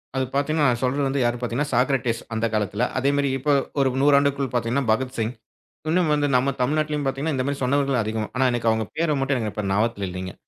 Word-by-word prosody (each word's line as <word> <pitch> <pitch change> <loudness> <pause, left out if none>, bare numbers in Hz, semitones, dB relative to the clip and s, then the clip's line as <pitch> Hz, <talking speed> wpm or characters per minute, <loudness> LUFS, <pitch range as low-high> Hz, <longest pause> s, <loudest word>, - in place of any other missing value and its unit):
அது 130 - +1
பாத்தீங்கன்னா, 145 +1 +2
நான் 120 0 -1
சொல்றது 135 +1 0
யாரு 120 0 0
பாத்தீங்கன்னா 125 +5 -2
சாக்ரடீஸ் 125 -2 +1
அந்தக் 110 0 -1
காலத்துல. 105 +2 0
அதே 135 +2 +2
மாதிரி 140 -1 +1
இப்போ 145 +2 +1 0.3
ஒரு 135 -1 +3
100 145 0 +5
ஆண்டுக்குள் 140 -2 -1
பாத்தீங்கன்னா 120 +3 0
பகத்சிங். 120 -1 -1 0.6
இன்னும் 150 -4 +2
நம்ம 135 +2 +1
தமிழ்நாட்டிலும் 150 +1 0
பாத்தீங்கன்னா, 140 +3 -1
இந்த 130 - -1
மாரி 140 -1 -3
சொன்னவர்கள் 135 -2 +1
அதிகம். 110 0 -3
ஆனா 130 0 +3
எனக்கு 115 -1 +1
அவங்க 110 -2 -1
பேரு 155 -3 +1
மட்டும் 135 -1 +1
எனக்கு 110 -2 -3
இப்ப 105 -2 -3
ஞாபகத்தில் 100 -1 0
இல்லைங்க. 95 0 -6
130 Hz, 195 wpm, -23 LUFS, 115-140 Hz, 0.6 s, 100